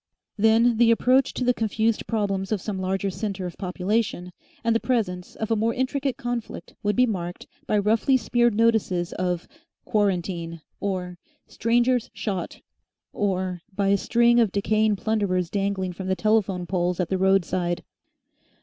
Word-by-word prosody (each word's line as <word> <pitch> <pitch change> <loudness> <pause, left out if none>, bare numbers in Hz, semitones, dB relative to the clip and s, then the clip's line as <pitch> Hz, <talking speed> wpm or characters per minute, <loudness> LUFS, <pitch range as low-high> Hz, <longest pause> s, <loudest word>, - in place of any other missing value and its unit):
Then 225 +2 +4
the 235 0 +5
approach 255 +3 +3
to - - -1
the 250 0 +3
confused 220 0 0
problems 195 -3 -1
of 215 - +1
some 195 0 -4
larger 190 +1 -1
centre 195 -1 -4
of 175 - -6
population 185 0 -1 0.3
and 230 0 +2
the - - +3
presence 200 -9 -2
of 220 0 -4
a - - +4
more 225 +2 0
intricate 265 +1 -1
conflict 240 -1 -5
would 205 0 0
be 250 - +5
marked 180 -6 -4 0.2
by 210 - +2
roughly 220 +6 +3
smeared 240 -2 +2
notices 210 -6 +1
of 180 -2 -2 0.4
"Quarantine" 175 -5 -1 0.2
or 180 -3 -3 0.3
"Strangers 240 +1 +1
Shot," 190 -5 -4 0.5
or 185 -3 -1
by 200 -1 +1
a 200 - +5
string 235 +3 +3
of 225 -5 +3
decaying 215 +1 +2
plunderers 195 -5 -1
dangling 195 -2 -1
from 185 +1 -6
the 190 - +1
telephone 200 -4 +1
poles 180 0 -1
at 180 - 0
the 190 - 0
roadside. 185 -2 +1
205 Hz, 155 wpm, -25 LUFS, 185-230 Hz, 0.5 s, the